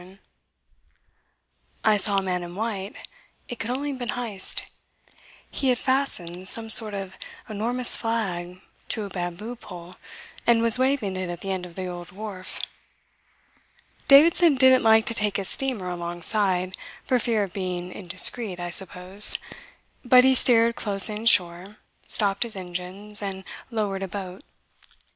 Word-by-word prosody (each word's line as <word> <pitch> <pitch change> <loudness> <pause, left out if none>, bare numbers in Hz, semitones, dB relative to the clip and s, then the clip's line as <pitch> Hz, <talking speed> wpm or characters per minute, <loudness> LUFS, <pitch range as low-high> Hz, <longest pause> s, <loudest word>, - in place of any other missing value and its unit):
I 215 -1 +4
saw 200 0 +4
a 195 - +1
man 180 -1 -2
in 175 0 -8
white. 205 -1 -4 0.5
It 245 - -8
could 220 - -4
only 280 +3 -2
have 265 - -7
been 245 -1 -5
Heyst. 225 -6 -2 0.9
He 270 - -1
had 250 - +2
fastened 195 -10 -1
some 225 -1 +2
sort 215 -3 0
of 190 -1 -7 0.3
enormous 235 +4 0
flag 185 -6 -3 0.3
to 220 - -1
a 200 - -6
bamboo 180 +6 -5
pole, 180 -5 -11 0.5
and 230 -1 +4
was 230 +1 +5
waving 260 -7 0
it 185 -1 -4
at 175 -1 -7
the 195 - -4
end 185 -1 -4
of 170 - -16
the 185 - -5
old 175 -1 -8
wharf. 195 -1 -8 1.5
Davidson 315 +2 +6
didn't 260 0 +5
like 220 -1 +4
to 230 - +1
take 210 -2 +1
his 195 -2 -3
steamer 255 -9 -2
alongside 180 +2 -1 0.3
for 255 - +1
fear 225 -3 0
of 190 -3 -7
being 180 -2 -4
indiscreet, 185 +2 +1
I 175 0 -5
suppose; 185 +2 +3 0.7
but 250 0 +6
he 265 0 +5
steered 235 -2 +5
close 200 -1 +1
inshore, 195 -3 +1 0.3
stopped 200 -2 +2
his 235 -3 +1
engines, 185 +3 -4
and 195 -1 -5 0.3
lowered 210 -4 -3
a 195 - -3
boat. 190 +4 -8
205 Hz, 150 wpm, -24 LUFS, 185-230 Hz, 1.5 s, Davidson